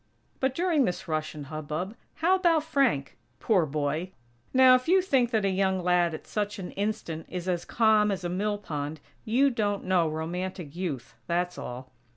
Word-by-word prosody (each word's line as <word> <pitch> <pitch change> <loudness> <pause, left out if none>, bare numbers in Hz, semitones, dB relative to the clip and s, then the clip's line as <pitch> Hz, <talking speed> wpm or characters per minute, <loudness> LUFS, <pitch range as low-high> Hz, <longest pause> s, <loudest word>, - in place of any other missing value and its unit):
But, 265 0 0
during 335 -6 +2
this 185 0 -3
rush 155 -1 -2
and 145 -2 -7
hubbub, 155 - -4 0.2
how 345 +4 +2
about 340 -5 +3
Frank? 275 - 0 0.2
Poor 185 - +2
boy! 155 +5 -2 0.4
Now, 260 -1 +7
if 255 0 +2
you 375 +3 +5
think 270 -10 +2
that 220 -4 +1
a - - +3
young 190 -1 +1
lad 175 -2 +2
at - - -10
such 210 0 -2
an 185 -3 -6
instant 195 -6 -3
is 180 0 -5
as 175 -2 -1
calm 220 -2 +3
as 195 -2 -2
a - - -1
mill 205 +4 -1
pond, 150 -5 -5 0.3
you 260 +5 +3
don't 205 -4 -1
know 180 -3 +2
romantic 170 0 -4
Youth, 155 -9 -4
that's 175 +1 0
all. 125 +1 -7
185 Hz, 185 wpm, -28 LUFS, 160-225 Hz, 0.4 s, Now